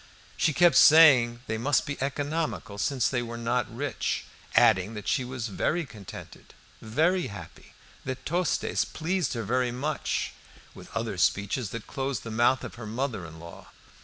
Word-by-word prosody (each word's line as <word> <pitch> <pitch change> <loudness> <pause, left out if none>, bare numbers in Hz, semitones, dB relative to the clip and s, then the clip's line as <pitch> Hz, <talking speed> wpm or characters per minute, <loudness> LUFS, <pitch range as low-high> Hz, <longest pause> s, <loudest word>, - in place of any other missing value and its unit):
She - - +2
kept 170 -1 +5
saying 130 -7 +7
they 110 -1 -3
must 140 +5 +2
be 145 -3 -5
economical 145 -6 -3
since 130 +2 +1
they 125 -2 0
were 115 0 -6
not 115 0 -1
rich, 130 +1 -3 0.3
adding 110 -2 +4
that 105 - -7
she 130 - +1
was 125 -2 -5
very 165 - -1
contented, 105 -7 -12 0.3
very 160 +11 +1
happy, 100 -5 -11 0.3
that 130 0 -5
Tostes 175 +2 0
pleased 175 -1 -2
her 115 -2 -3
very 125 +3 0
much, 145 +5 -2 0.4
with - - -13
other 110 -5 -3
speeches 100 +6 +1
that 115 +1 -7
closed 135 -2 -3
the 115 - -6
mouth 120 +3 +2
of 120 - -8
her 110 - -6
mother 110 -5 -3
in 80 0 -12
law. 85 +1 -11
125 Hz, 160 wpm, -27 LUFS, 110-145 Hz, 0.4 s, saying